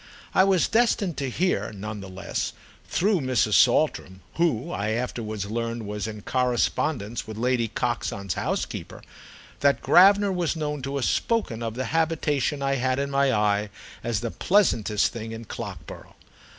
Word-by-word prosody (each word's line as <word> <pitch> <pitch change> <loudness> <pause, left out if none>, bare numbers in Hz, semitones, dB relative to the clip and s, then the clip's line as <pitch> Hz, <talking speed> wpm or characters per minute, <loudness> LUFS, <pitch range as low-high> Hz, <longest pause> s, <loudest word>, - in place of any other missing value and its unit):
I - - +6
was 190 -3 +3
destined 220 -7 +2
to 135 -2 -2
hear, 180 +3 0
none 105 +1 -6
the 95 - -9
less, 95 +1 -4 0.3
through 195 -2 +1
Mrs. 125 -5 +1
Saltram—who, 130 - +1
I 105 -6 -2
afterwards 110 -4 -3
learned, 115 +1 -3
was 105 0 -4
in 105 -1 -7
correspondence 125 -2 0
with 110 -1 -7
Lady 120 0 +1
Coxon's 100 -4 -2
housekeeper—that 140 0 -3
Gravener 200 +2 +6
was 175 -2 0
known 150 -2 -3
to 135 +2 -4
have 140 - 0
spoken 215 - 0
of 115 -1 -3
the 130 +1 -2
habitation 150 -4 0
I 135 0 +1
had 130 0 0
in 140 0 -2
my 140 -1 +3
eye 105 -2 +1 0.3
as 115 -4 -1
the 115 -2 -3
pleasantest 115 - +2
thing 115 -1 -6
at 115 -1 -9
Clockborough. - - -8
125 Hz, 150 wpm, -25 LUFS, 110-155 Hz, 0.3 s, I